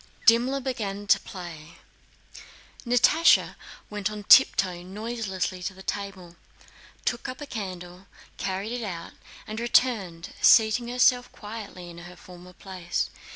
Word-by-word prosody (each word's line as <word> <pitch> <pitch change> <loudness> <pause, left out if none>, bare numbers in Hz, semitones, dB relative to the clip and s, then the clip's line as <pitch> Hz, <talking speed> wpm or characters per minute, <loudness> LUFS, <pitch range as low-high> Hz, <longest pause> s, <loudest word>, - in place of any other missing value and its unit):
Dimmler 245 +4 +4
began 210 -6 -4
to 200 - +4
play; 170 -4 -10 1.1
Natásha 245 +7 +4 0.3
went 210 -1 -3
on 210 -1 -7
tiptoe 185 -7 +5
noiselessly 190 -1 -4
to 190 +1 -4
the 190 - -12
table, 190 -4 -6 0.7
took 240 - -2
up 255 - -7
a 295 - -6
candle, 185 -6 -7 0.3
carried 195 +3 -3
it 245 -1 -3
out, 170 -5 -6 0.3
and 215 +1 -6
returned, 220 -8 +1
seating 225 +1 +5
herself 245 0 +3
quietly 205 -4 -9
in 170 0 -10
her 175 +1 -11
former 180 0 -14
place. 180 -1 -4
200 Hz, 125 wpm, -26 LUFS, 180-235 Hz, 1.1 s, tiptoe